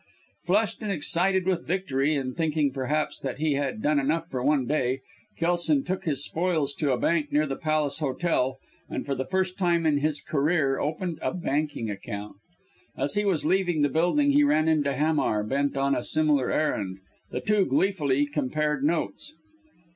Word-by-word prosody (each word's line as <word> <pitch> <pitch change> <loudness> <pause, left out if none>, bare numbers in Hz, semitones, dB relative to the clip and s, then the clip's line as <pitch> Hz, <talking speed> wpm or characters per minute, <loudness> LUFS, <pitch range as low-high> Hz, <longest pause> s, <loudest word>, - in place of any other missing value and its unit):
Flushed 205 +6 +1
and 210 -2 -2
excited 185 +2 +2
with 185 -2 -1
victory, 155 -5 0
and 130 -2 -3
thinking, 155 -3 +1
perhaps, 145 +3 -2
that 135 -2 -4
he 155 0 +1
had 135 -6 -2
done 150 -1 +3
enough 160 +4 0
for 125 -2 -2
one 140 -2 +2
day, 130 -2 0 0.4
Kelson 175 - +1
took 185 -4 -3
his 145 -3 0
spoils 160 -5 0
to 145 -2 0
a 125 - +1
bank 155 +1 0
near 150 +1 +2
the 135 -2 -3
Palace 155 -2 0
Hotel, 135 -2 0 0.3
and - - -4
for 140 - -1
the 130 0 -3
first 185 +2 -1
time 170 -3 +2
in 150 -2 +3
his 150 0 0
career 145 -2 +1
opened 160 +2 -3
a - - -1
banking 145 -8 -2
account. 100 +1 -7 0.6
As 140 - 0
he 205 0 0
was 180 -7 +1
leaving 175 -3 +2
the 145 - +3
building 180 - +2
he 290 +1 +5
ran 160 - +3
into 145 -3 +2
Hamar, 145 -7 +1
bent 140 +5 -1
on 140 0 +2
a - - -1
similar 150 -4 +2
errand. 100 -11 -1 0.3
The - - -3
two 210 -2 +2
gleefully 145 -8 +1
compared 150 0 -1
notes. 170 - -2
150 Hz, 175 wpm, -26 LUFS, 140-175 Hz, 0.6 s, he